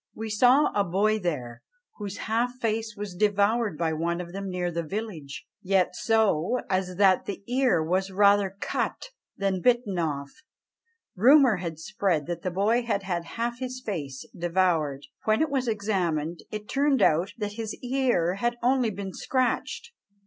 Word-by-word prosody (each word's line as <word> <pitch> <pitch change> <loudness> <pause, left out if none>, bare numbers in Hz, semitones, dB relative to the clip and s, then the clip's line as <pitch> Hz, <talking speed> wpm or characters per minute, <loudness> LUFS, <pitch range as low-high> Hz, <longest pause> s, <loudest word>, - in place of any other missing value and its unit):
"We 220 0 -5
sawe 250 +7 +5
a 205 - +2
boy 205 +4 +1
there, 135 - -4 0.4
whose 205 -2 -6
half 235 +2 0
face 225 -3 -2
was 205 -2 -5
devoured 205 0 +1
by 160 -1 0
one 170 +2 -1
of 175 -1 -7
them 195 0 -4
near 180 -1 -2
the 170 0 -2
village; 165 -5 -6 0.2
yet 185 -1 +1
so, 220 0 +2
as 185 -1 0
that 190 -1 +4
the 200 - -6
eare 245 -9 +2
was 185 +4 0
rather 200 0 +3
cut - - -3 0.3
than 195 -2 0
bitten 235 -6 +2
off." 140 -4 -2 0.8
Rumour 255 +2 +6
had 170 -3 -5
spread 160 -1 -1
that 175 +2 -4
the 185 - -2
boy 205 +7 +2
had 220 -4 -1
had 175 -3 -2
half 235 +1 -2
his 255 -1 -4
face 150 - -5
devoured; 170 -5 0 0.2
when 215 0 +3
it 315 -2 +1
was 260 -3 0
examined, 180 -7 -1
it 210 0 -6
turned 275 -4 +2
out 170 +6 +2
that 205 -2 -3
his 220 -1 -5
ear 245 -9 +1
had 240 +1 0
only 250 -1 +3
been 195 -2 -6
scratched! 255 - -1
200 Hz, 165 wpm, -26 LUFS, 175-230 Hz, 0.8 s, Rumour